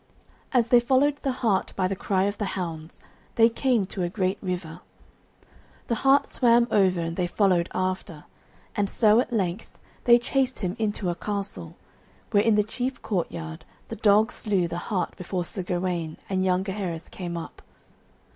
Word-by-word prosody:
As 240 -3 +2
they 245 - +7
followed 270 +4 +2
the 275 - 0
hart 225 -6 0
by 185 -1 +1
the 195 - -2
cry 190 0 0
of 205 +1 -2
the 210 - 0
hounds, 165 -3 -6 0.3
they 230 0 +6
came 235 -3 +1
to 190 0 -6
a 175 - 0
great 190 +1 -1
river. 180 -3 -4 1.1
The - - +2
hart 275 +1 +5
swam 235 -1 +3
over, 190 -3 +3
and 165 0 -3
they 180 -1 0
followed 180 -2 +2
after, 185 -4 -3 0.5
and 200 -1 0
so 215 +1 +4
at 245 - -1
length 195 -3 -1 0.4
they 240 -1 +8
chased 260 +1 -1
him 185 -2 -2
into 205 -4 -1
a - - -1
castle, 195 - -4 0.6
where 205 - +5
in 220 0 +3
the 210 - +4
chief 250 +4 -4
courtyard 80 - -3 0.3
the - - -4
dogs 215 +2 +4
slew 195 -5 0
the 170 +1 -4
hart 180 -6 -1
before 180 0 -3
Sir 190 +3 -5
Gawaine 175 -3 -2
and 190 -1 0
young 185 0 +2
Gaheris 190 -4 -4
came 175 -2 -6
up. 165 - -8
195 Hz, 175 wpm, -26 LUFS, 175-225 Hz, 1.1 s, they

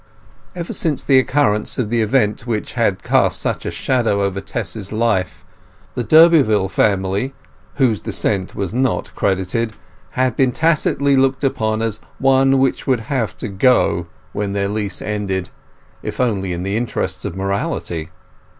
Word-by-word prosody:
Ever 170 -1 -5
since 155 -4 -1
the 135 -2 +5
occurrence 130 -6 +1
of 115 -4 -2
the 120 -1 +2
event 110 0 +1
which 110 -3 -3
had - - 0
cast - - +2
such - - -2
a - - 0
shadow 115 -6 0
over 100 0 -2
Tess's 100 -1 -5
life, 110 -5 -1 0.5
the 125 - -2
Durbeyfield 125 - +5
family 100 +6 0 0.4
(whose 115 - +2
descent 95 +1 -1
was 100 -1 -3
not 130 0 -1
credited) 95 +4 -1 0.4
had 130 -2 +1
been 130 -2 +3
tacitly 140 -2 +2
looked 135 +1 +2
on 110 -4 0
as 110 -2 -1 0.2
one 135 0 +4
which 135 +1 0
would 130 -4 +2
have 120 -5 -1
to - - -4
go 100 -4 +2 0.3
when 100 -1 -2
their 100 0 0
lease 105 -3 -2
ended, 100 -3 -2 0.5
if - - -6
only 100 -7 0
in 90 0 -3
the 100 +2 -2
interests 95 -6 -1
of 100 -5 -4
morality. 95 -4 -3
110 Hz, 150 wpm, -19 LUFS, 100-130 Hz, 0.5 s, the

